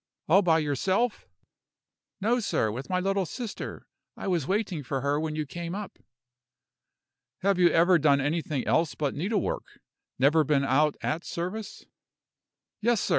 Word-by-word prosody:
"All 190 +5 +6
by 165 -4 +4
yourself?" 185 - 0 0.9
"No, 230 +5 +2
sir, 110 - 0
with 125 +5 -6
my 180 -1 +1
little 195 0 0
sister. 230 +3 -6 0.3
I - - -5
was 170 -7 0
waiting 190 -5 -1
for 135 0 -3
her 140 +2 +1
when 155 -1 -3
you 155 -1 -2
came 170 +4 -5
up." 205 -1 -7 1.4
"Have 195 -1 +2
you 175 -1 +6
never 170 +2 +4
done 140 -2 +4
anything 145 -1 -1
else 160 -1 +1
but 145 -3 -1
needlework? 195 +6 -2 0.4
never 150 +5 +4
been 140 -1 +2
out 145 +2 +2
at 160 +2 -1
service?" 190 +5 -5 1.0
"Yes, 235 0 +3
sir. - - -2
170 Hz, 150 wpm, -27 LUFS, 145-195 Hz, 1.4 s, All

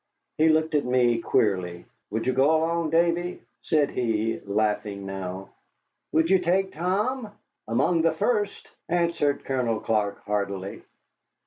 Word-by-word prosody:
He 160 +1 +5
looked 160 0 +2
at 150 - +2
me 125 -2 +2
queerly. 90 -6 0 0.2
"Would 110 +2 -2
you 130 - +1
go 135 +5 +4
along, 165 0 0
Davy?" 170 +2 +1 0.2
said 150 -3 +1
he, 115 -2 -1
laughing 105 -1 -1
now. 95 0 -6 0.6
"Would 160 +2 +2
you 190 - +6
take 190 +2 +1
Tom?" 210 - -1 0.4
"Among 135 +9 +2
the 165 0 +2
first," 205 +3 -1 0.2
answered 170 -4 +1
Colonel 125 -4 0
Clark, 105 -2 -1
heartily. 100 -2 -3
135 Hz, 130 wpm, -26 LUFS, 105-170 Hz, 0.6 s, you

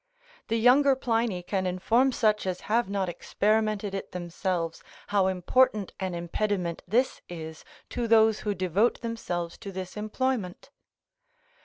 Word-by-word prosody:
The 230 - +1
younger 265 +4 +5
Pliny 230 -7 0
can 190 0 -1
inform 230 +9 +2
such 215 -5 +1
as 180 -1 -2
have 230 -1 +1
not 200 -2 -1
experimented 210 +3 0
it 195 - -5
themselves, 175 -1 -3 0.3
how 200 -2 +3
important 200 +3 +2
an 185 -2 -2
impediment 175 0 -2
this 245 +7 +1
is 160 -2 -8 0.3
to 240 -1 -2
those 220 -1 +5
who 205 -1 -2
devote 185 +5 +1
themselves 175 -8 -4
to 200 -3 -7
this 185 -1 -6
employment. 215 0 -2
205 Hz, 135 wpm, -27 LUFS, 180-230 Hz, 0.3 s, younger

